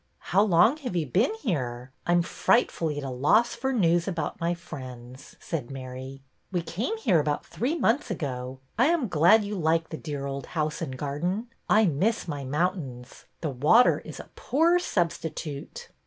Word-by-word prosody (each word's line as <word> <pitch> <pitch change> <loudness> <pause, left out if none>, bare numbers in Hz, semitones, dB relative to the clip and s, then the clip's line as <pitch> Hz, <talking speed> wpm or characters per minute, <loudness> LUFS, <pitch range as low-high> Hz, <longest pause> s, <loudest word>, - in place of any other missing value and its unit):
How 195 - +6
long 205 - +4
have 255 -11 -5
you 165 -3 +1
been 205 - +1
here? 125 - -2 0.2
I 175 - +3
am 175 0 +4
fright 235 +7 +2
fully 155 -3 -2
at 145 - -4
a 135 - -4
loss 175 - +3
for 265 +3 -2
news 175 -7 +2
about 170 -2 -3
my 170 +1 +1
friends,'' 130 -6 -10
said 145 -8 -4
Mary. 130 0 -8 0.3
'^We 175 -3 -1
came 240 - -2
here 200 - +3
about 150 0 -1
three 275 +8 -2
months 260 -3 +1
ago. 130 -7 -4 0.2
I 255 - +6
am 325 -7 +2
glad 175 +6 +5
you 205 +1 -4
like 165 -3 +1
the 160 - -5
dear 145 -3 -5
old 140 -1 -5
house 155 +1 -1
and 130 -5 -4
garden. 175 - -2 0.2
I 215 +1 +5
miss 190 +7 0
my 145 -3 -4
mountains. 135 -4 -3 0.2
The 155 - -2
water 150 - +5
is - - -10
a - - -11
poor 335 +6 +3
substitute." 160 - -3
165 Hz, 180 wpm, -27 LUFS, 140-210 Hz, 0.3 s, How